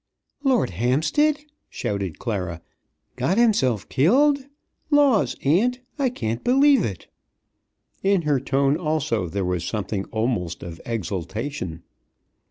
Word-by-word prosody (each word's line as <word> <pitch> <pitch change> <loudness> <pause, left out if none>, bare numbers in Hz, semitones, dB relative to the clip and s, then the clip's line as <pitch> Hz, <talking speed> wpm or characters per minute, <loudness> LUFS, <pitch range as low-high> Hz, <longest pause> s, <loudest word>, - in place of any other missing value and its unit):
"Lord 255 - +2
Hampstead!" 155 - +1 0.3
shouted 100 -5 -3
Clara. 90 -8 -4 0.5
"Got 190 - +1
himself 130 - +2
killed! 270 - +3 0.4
Laws, 285 -7 +3
aunt, 220 - +2 0.2
I 270 -2 +2
can't 115 - -4
believe 275 -1 +5
it!" 95 -5 -4 1.0
In 195 -3 +2
her 145 -3 +2
tone, 135 +2 +1
also, 150 - -1
there 100 +2 -2
was 90 -2 -1
something 100 0 -3
almost 110 -8 -2
of 85 -1 -8
exultation. 95 - -4
130 Hz, 110 wpm, -23 LUFS, -, 1.0 s, believe